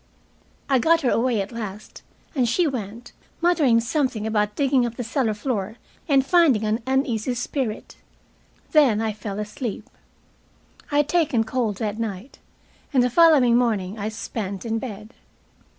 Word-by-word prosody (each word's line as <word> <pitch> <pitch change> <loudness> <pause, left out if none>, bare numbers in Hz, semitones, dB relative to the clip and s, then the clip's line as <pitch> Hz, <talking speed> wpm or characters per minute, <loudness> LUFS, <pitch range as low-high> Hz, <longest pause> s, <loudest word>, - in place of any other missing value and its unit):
I 270 -2 +3
got 330 +6 +3
her 250 - +1
away 235 -2 +1
at 195 - -6
last, 215 -3 -8 0.3
and 255 -6 +1
she 350 +8 +2
went, 235 -4 -5 0.3
muttering 315 -9 +3
something 245 -3 -1
about 210 -1 0
digging 270 -2 +2
up 235 -1 -3
the 245 - -4
cellar 230 -2 -1
floor 215 -2 -3 0.3
and 275 -2 +4
finding 295 - +4
an 215 +2 0
uneasy 255 -3 0
spirit. 245 -2 -4 0.7
Then 275 -9 +4
I 220 -1 -1
fell 205 -1 -6
asleep. 210 +2 -5 1.0
I 290 - +1
had 295 -1 +3
taken 300 -10 +2
cold 225 -4 -2
that 215 0 -3
night, 220 +2 -5 0.5
and 260 -4 +3
the 250 - 0
following 295 -7 +5
morning 215 -4 0
I 210 +1 -2
spent 215 -2 -5
in 225 0 -1
bed. 215 -1 -8
235 Hz, 150 wpm, -23 LUFS, 215-270 Hz, 1.0 s, following